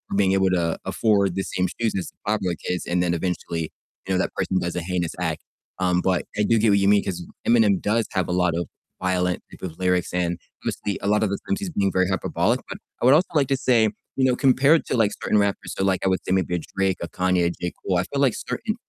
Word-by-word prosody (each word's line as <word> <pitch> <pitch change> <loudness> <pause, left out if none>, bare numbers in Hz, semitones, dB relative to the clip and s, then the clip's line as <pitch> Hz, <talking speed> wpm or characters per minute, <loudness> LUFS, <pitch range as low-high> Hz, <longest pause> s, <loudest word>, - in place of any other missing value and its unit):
being 100 -1 +3
able 95 -1 +3
to 85 -3 0
afford 100 -4 +2
the 95 - -1
same 90 0 -1
shoes 115 -2 +1
as - - -5
the - - -14
popular 95 -5 0
kids 90 -1 -2
and 90 +1 +1
then 85 -1 +1
eventually, 85 -2 -3 0.4
you 95 - 0
know, - - +2
that - - -1
person 95 - -1
does 85 -1 -2
a 90 - -1
heinous 90 -1 -2
act. 80 -3 -2 0.4
Um, 90 -1 +2
but 95 -2 0
I 105 - +2
do 115 +2 +3
get 110 0 +3
what 100 0 +4
you 100 - +2
mean 105 0 +4
'cause 90 -2 -4 0.2
Eminem 110 -5 +4
does 110 +2 +1
have 95 -2 0
a - - -3
lot 90 -2 +2
of 85 -2 -2 0.3
violent 90 -1 0
type - - -14
of 80 - -15
lyrics, 90 -1 +1
and 85 -1 -1 0.2
obviously 100 - -2
a 100 - -2
lot 105 +1 +3
of 105 - +1
the 100 - -1
times 200 -1 0
he's 200 -3 -4
being 100 - 0
very 95 0 +2
hyperbolic, 95 - 0
but - - -7 0.2
I - - +1
would 130 - +7
also 170 +4 +4
like 140 -3 +3
to 135 - +2
say, 115 -4 +3 0.3
you 130 - +1
know, 125 -1 +3
compared 140 +4 +4
to 125 - 0
like 105 -2 +3
certain 105 - +2
rappers, 100 -1 0
so 95 - 0
like 95 -1 +1
I - - +2
would 95 - +1
say - - -3
maybe 95 -2 +1
a - - -1 0.2
Drake, 95 -2 +1
a 85 - -3
Kanye, 90 -1 +1
a - - +2
J. 90 0 -5
Cole, 90 -2 +1
I 90 - +2
feel 140 0 -2
like 130 -5 +4
certain, - - -3
95 Hz, 265 wpm, -23 LUFS, 90-105 Hz, 0.4 s, would